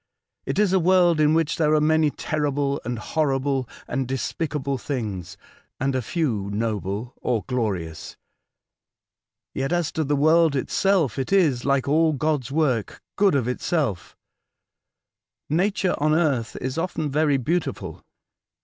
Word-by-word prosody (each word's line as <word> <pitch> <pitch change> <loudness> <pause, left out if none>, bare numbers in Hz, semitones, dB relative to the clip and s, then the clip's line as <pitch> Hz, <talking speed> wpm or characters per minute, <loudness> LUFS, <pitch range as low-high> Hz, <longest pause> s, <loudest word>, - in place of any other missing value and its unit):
It - - -2
is 205 -2 +3
a 190 - +4
world 175 -2 +4
in 155 +1 +4
which 165 -2 +1
there 155 -1 +3
are - - +4
many 155 0 +3
terrible, 145 -2 -1
and 120 +1 -3
horrible, 135 0 -1 0.2
and 130 -2 -2
despicable 140 +1 -2
things, 105 - -4 0.4
and 135 +1 0
a 130 - 0
few 115 - -2
noble 105 +1 -3
or 115 -4 -1
glorious. 100 -11 -3 1.4
Yet, 135 +2 -2
as 175 -3 0
to 160 - -1
the 145 0 0
world 160 +1 +4
itself, 160 - +1
it 135 - -3
is, 155 -11 +3
like 140 -1 +1
all 160 +2 +3
God's 145 -3 -1
work, 135 -8 0 0.2
good 200 -6 +3
of 130 -4 +1
itself. 125 - -2 1.3
Nature 190 +3 +1
on 155 +1 +2
earth 140 -9 0
is 130 +5 -3
often 160 -4 -2
very 150 -1 +2
beautiful. 160 +7 -3
145 Hz, 140 wpm, -24 LUFS, 125-160 Hz, 1.4 s, a